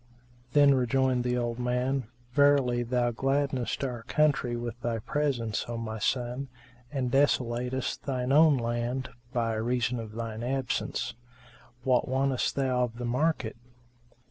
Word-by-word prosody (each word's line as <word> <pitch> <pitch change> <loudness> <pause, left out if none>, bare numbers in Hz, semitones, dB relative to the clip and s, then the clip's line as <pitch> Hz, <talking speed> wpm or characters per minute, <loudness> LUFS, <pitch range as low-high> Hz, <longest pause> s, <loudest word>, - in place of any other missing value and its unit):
Then 145 -1 +7
rejoined 130 0 +2
the 125 0 0
old 120 0 -2
man, 125 +1 0 0.3
"Verily, 140 -3 +4
thou 120 0 +1
gladdenest 135 +1 0
our 125 -3 -3
country 135 -2 +1
with 120 0 -5
thy 120 -1 -1
presence, 120 -3 -1
O 120 0 -4
my 110 -1 -4
son, 125 +3 -1 0.4
and 130 -3 -1
thou 140 +3 +6
desolatest 125 +1 -2
shine 130 -2 -1
own 150 0 +6
land 120 +2 -2 0.2
by 115 -3 0
reason 120 +2 0
of 110 -1 -7
shine 115 -1 -4
absence. 130 +1 -2 0.7
What 125 -2 +2
wantest 130 0 0
thou 130 -2 +2
of 115 -1 -10
the 120 - -4
market?" 130 -2 0
125 Hz, 140 wpm, -28 LUFS, 120-135 Hz, 0.7 s, Then